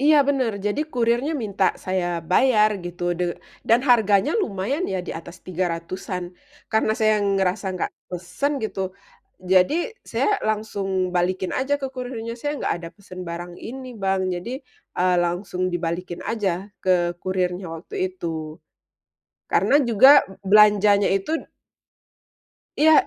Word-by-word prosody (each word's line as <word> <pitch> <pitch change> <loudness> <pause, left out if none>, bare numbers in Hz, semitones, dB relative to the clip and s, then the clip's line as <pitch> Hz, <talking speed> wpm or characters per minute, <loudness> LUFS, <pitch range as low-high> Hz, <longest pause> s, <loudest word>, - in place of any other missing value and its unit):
Iya, 300 +2 +5
bener, 260 -5 +1
jadi 210 +8 0
kurirnya 240 +4 +1
minta 200 -2 0 0.2
saya 185 -1 0 0.2
bayar 215 0 +5
gitu 175 0 -7 0.2
de 180 - +1 0.4
dan 230 +2 +5
harganya 220 +2 +4
lumayan 225 - -1
ya 190 - -1
diatas 170 +2 -7
300-an 180 +1 -3 0.5
karena 220 0 +3
saya 215 0 +4
ngerasa 195 -1 0
nggak - - -2 0.2
pesen 180 +11 -2
gitu, 195 - -4 0.7
jadi 185 +9 +5 0.4
saya - - +1 0.2
langsung 210 -2 -2 0.3
balikin 185 +1 0
aja 275 +2 +1
ke 270 - -2
kurirnya 240 -3 -5
saya 290 0 -1
nggak - - 0
ada 165 - -7
pesen 185 -2 -11
barang 175 +1 -6
ini, 260 +3 -7
Bang. 190 0 +1
Jadi, 175 +6 -5 0.5
eee, 180 0 +3
langsung 180 +1 -3
dibalikin 175 +1 -3
aja 210 -4 0 0.3
ke 185 - +2 0.3
kurirnya 185 0 -1
waktu 165 - -11
itu. 160 -4 -6 0.9
Karena - - +3
juga 265 +6 +8 0.2
belanjanya 205 -1 +6
itu 305 +12 -1 1.4
iya, 315 +1 +7
195 Hz, 125 wpm, -23 LUFS, 180-230 Hz, 1.4 s, juga